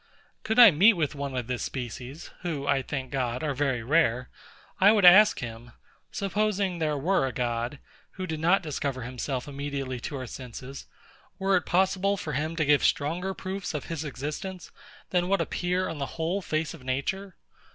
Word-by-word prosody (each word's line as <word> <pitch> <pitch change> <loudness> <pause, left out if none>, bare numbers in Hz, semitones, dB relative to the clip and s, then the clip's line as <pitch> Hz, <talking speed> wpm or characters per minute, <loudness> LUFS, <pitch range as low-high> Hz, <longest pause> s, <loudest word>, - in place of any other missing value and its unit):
Could 220 +1 -2
I 235 -4 +10
meet 195 +9 +6
with 155 -6 -1
one 140 -2 -4
of 125 - -2
this 125 +1 -3
species 130 +4 -6
(who, 155 -6 -3
I 140 -1 +2
thank 130 -1 -5
God, 125 -2 -2
are 150 -2 0
very 135 -4 -1
rare), 125 -3 +2 0.5
I 200 +2 +7
would 210 -4 +4
ask 210 +4 +8
him: 120 0 -8 0.4
Supposing 200 -2 -1
there 155 -2 0
were 155 -1 +1
a - - -3
God, 120 +2 -2 0.4
who 185 - -5
did 160 -3 -4
not 175 +4 +3
discover 140 -4 -3
himself 125 +2 -4
immediately 140 -2 -4
to 140 - -5
our 130 -1 -4
senses, 130 +2 -9 0.5
were 195 0 +2
it - - 0
possible 190 +2 +2
for 155 -5 -5
him 155 +5 -2
to 155 -2 +1
give 145 0 +4
stronger 175 +6 0
proofs 190 -3 -5
of 150 - -4
his 160 -1 -3
existence, 155 +6 -6 0.4
than 180 -1 +1
what 195 +1 +2
appear 180 +1 -1
on 160 - -5
the 140 - -2
whole 170 +5 -1
face 155 -2 -2
of 160 -6 -12
Nature? 180 +10 -3
150 Hz, 185 wpm, -27 LUFS, 130-185 Hz, 0.5 s, I